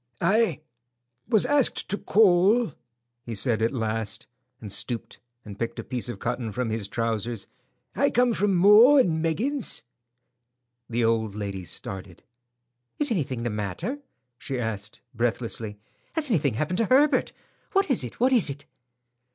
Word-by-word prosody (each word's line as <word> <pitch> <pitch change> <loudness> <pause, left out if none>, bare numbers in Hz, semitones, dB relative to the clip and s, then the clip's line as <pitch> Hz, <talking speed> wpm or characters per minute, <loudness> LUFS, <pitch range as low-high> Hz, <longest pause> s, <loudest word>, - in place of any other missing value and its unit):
"I—was 125 - -1
asked 285 0 +2
to 200 - 0
call," 200 - +4 0.5
he 115 -2 -6
said 110 +2 +2
at 115 - +2
last, 110 -2 -3 0.3
and 105 -3 -7
stooped 120 +3 -2 0.3
and 100 -2 -10
picked 115 - -3
a - - -5
piece 125 -1 -4
of 120 - -5
cotton 120 -2 -3
from 120 +1 -2
his 110 -2 -2
trousers. 115 -1 -2 0.5
"I - - +3
come 245 0 +2
from 205 -2 +1
'Maw 210 +10 +7
and 165 -12 +3
Meggins.'" 225 - 0 1.1
The 120 0 0
old 110 -2 0
lady 100 -3 -5
started. 95 -4 -7 0.7
"Is 290 -3 +2
anything 135 - -2
the 120 - -1
matter?" 105 - -4 0.4
she 135 -2 -4
asked, 105 -3 -4
breathlessly. 115 -2 -2 0.4
"Has 305 -5 -1
anything 145 - +1
happened 155 +8 -1
to 230 - +3
Herbert? 280 +6 +3 0.4
What 390 -5 +2
is 240 - +2
it? 120 - -8
What 255 +2 +3
is 225 - +4
it?" 140 +1 -7
125 Hz, 145 wpm, -25 LUFS, -, 1.1 s, Maw